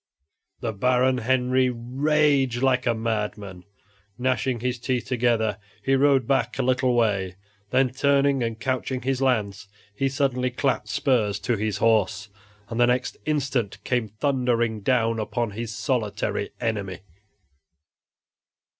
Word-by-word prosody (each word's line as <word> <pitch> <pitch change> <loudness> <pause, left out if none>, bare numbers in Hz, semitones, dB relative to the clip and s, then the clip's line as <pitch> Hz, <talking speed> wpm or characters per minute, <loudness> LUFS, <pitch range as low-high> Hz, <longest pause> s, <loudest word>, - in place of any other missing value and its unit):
The 115 -2 -2
Baron 125 +4 +2
Henry 130 +1 +2
raged 135 +1 +1
like 130 -1 +2
a 120 - +2
madman. 105 -4 -3 0.5
Gnashing 125 -1 0
his 125 0 -2
teeth 125 0 -1
together, 115 -4 +1 0.2
he 135 - +1
rode 135 -2 +4
back 135 0 0
a 135 - 0
little 125 0 +2
way; 100 -6 +1 0.3
then 130 +1 +2
turning 140 0 +2
and 115 -1 -2
couching 130 0 -2
his 135 0 -1
lance, 105 -7 0 0.3
he 135 +6 0
suddenly 130 -2 0
clapped 130 +1 -1
spurs 110 -8 +1
to 120 - 0
his 105 -1 -2
horse, 105 -3 +1 0.4
and 115 - -4
the 120 - +5
next 125 +1 0
instant 135 -8 -1
came 125 -3 0
thundering 120 -1 0
down 115 0 +1
upon 115 +1 -2
his 115 +2 -5
solitary 115 -3 -2
enemy. 100 -6 -3
125 Hz, 130 wpm, -24 LUFS, 110-130 Hz, 0.5 s, the